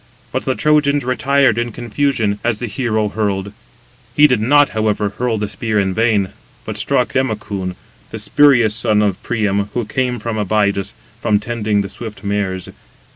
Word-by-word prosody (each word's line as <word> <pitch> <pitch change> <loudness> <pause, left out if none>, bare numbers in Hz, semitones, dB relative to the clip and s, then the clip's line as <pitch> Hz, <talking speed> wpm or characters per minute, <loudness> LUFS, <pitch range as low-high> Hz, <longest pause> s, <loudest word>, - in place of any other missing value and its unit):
But - - -2
the 130 - 0
Trojans 145 -2 +2
retired 130 -1 +2
in 120 0 -2
confusion, 115 -3 -1
as 120 -2 0
the 120 - -3
hero 110 -2 -1
hurled; 100 -2 -2 0.6
he 150 - +7
did 125 -7 +3
not, 145 +5 +4
however, 105 -1 0
hurl 115 +2 -2
the 105 0 -2
spear 110 -1 -1
in 95 -1 0
vain, 110 -3 +2 0.4
but - - -5
struck - - 0
Democoon, 105 -7 -2 0.3
the - - -6
spurious 125 -7 +4
son 110 -2 +2
of 100 +1 -1
Priam, 100 -4 0
who 120 -2 -1
came 125 +2 -1
from 110 -1 -3
Abydos, 100 -1 0 0.3
from 105 -1 +2
[tending] 105 -2 -1
the 100 - -5
swift 110 -1 -9
mares. 100 -3 -2
110 Hz, 165 wpm, -18 LUFS, 105-125 Hz, 0.6 s, he